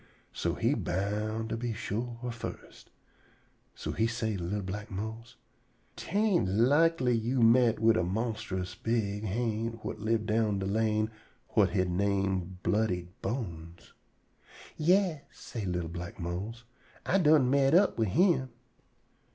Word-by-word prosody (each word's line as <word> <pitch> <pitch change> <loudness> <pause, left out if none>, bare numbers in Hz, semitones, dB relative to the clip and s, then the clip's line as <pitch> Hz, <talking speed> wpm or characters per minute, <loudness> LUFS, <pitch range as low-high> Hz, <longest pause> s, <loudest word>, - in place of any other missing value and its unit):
So - - -1
he - - +1
boun' 105 +4 -2
to - - -1
be 120 0 -3
sure 115 +2 -4 0.2
fust. 115 - -9 0.9
So - - -4
he 110 - +1
say 110 -2 -2
to 90 - -4
li'l 100 +4 -2
black 105 +3 -5
Mose: 110 +4 -6 0.6
"'Tain' 125 - +2
likely 145 -4 +3
you 120 +2 +1
met 115 0 +5
up 105 - -11
wid 110 0 +5
a - - +2
monstrous 95 -2 -3
big 105 +1 -1
ha'nt 115 +1 -2
whut - - -5
live 110 0 0
down 110 -2 +1
de 95 - -2
lane 110 +1 +1 0.4
whut 100 -3 +3
he 95 -3 +3
name 95 -1 0
Bloody 90 -5 0
Bones?" 85 -8 -5 0.8
"Yas," 175 -1 +2
say 110 -4 -7
li'l 90 -2 -2
black 85 +2 -7
Mose, 95 +7 -4 0.4
"I 195 - +3
done 150 -6 +5
met 140 +2 +4
up 190 -7 +4
wid 110 - +2
him." 160 - +3
110 Hz, 140 wpm, -30 LUFS, 95-120 Hz, 0.9 s, met